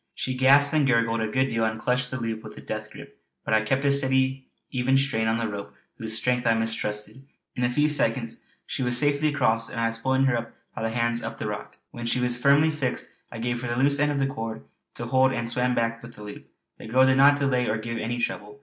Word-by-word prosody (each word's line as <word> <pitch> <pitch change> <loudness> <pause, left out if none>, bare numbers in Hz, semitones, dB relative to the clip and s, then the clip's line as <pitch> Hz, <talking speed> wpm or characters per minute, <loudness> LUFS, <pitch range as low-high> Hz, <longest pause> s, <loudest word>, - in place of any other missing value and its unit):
She 130 - -3
gasped 140 +3 +4
and 150 -3 +3
gurgled 115 -2 +2
a 110 - 0
good 130 +4 0
deal 115 -2 -1
and 110 0 -1
clutched 125 +1 0
the 130 - -4
loop 115 -1 -3
with 110 - -11
a - - -9
death - - -6
grip; - - -13 0.2
but - - -1
I 110 - +4
kept 135 +6 -1
a 140 - +4
steady 130 -1 +1 0.2
even 130 +1 +2
strain 125 -5 0
on 115 0 +1
the 115 -1 -1
rope 100 -1 -7 0.2
whose 110 -1 +1
strength 125 +1 0
I 115 - +4
mistrusted. 110 +1 -3 0.3
In 125 - -2
a 120 - +2
few 150 +5 +2
seconds 115 -5 0 0.2
she - - -4
was 125 -1 +1
safely 145 +2 +2
across, 115 -6 +1
and - - -5
I 115 - +1
was 115 0 -1
pulling 130 +3 +1
her 135 -2 +2
up 115 0 -5 0.2
by - - -6
the 115 - -1
hands 115 0 -1
up - - -6
the - - -5
rock. - - -6
When 120 0 -6
she 125 - +1
was 125 0 +1
firmly 145 +4 +4
fixed 140 -5 -3 0.2
I 115 - -7
gave 120 +1 -2
her 125 - -4
the 120 0 -2
loose 140 +1 +3
end 145 0 +2
of 145 - -2
the 135 - +1
cord 115 - -5 0.3
to 120 - -5
hold 130 +2 +3
and 120 -2 -2
swam 125 +1 0
back 115 0 -1
with 120 0 -12
the 105 - -11
loop. 105 0 -10 0.3
The - - -9
girl 130 +4 +4
did 130 0 +3
not 140 +1 +6
delay 130 -3 +1
or 110 - 0
give 115 +1 -5
any 120 +2 -3
trouble. 105 -1 -4
125 Hz, 260 wpm, -25 LUFS, 115-135 Hz, 0.3 s, not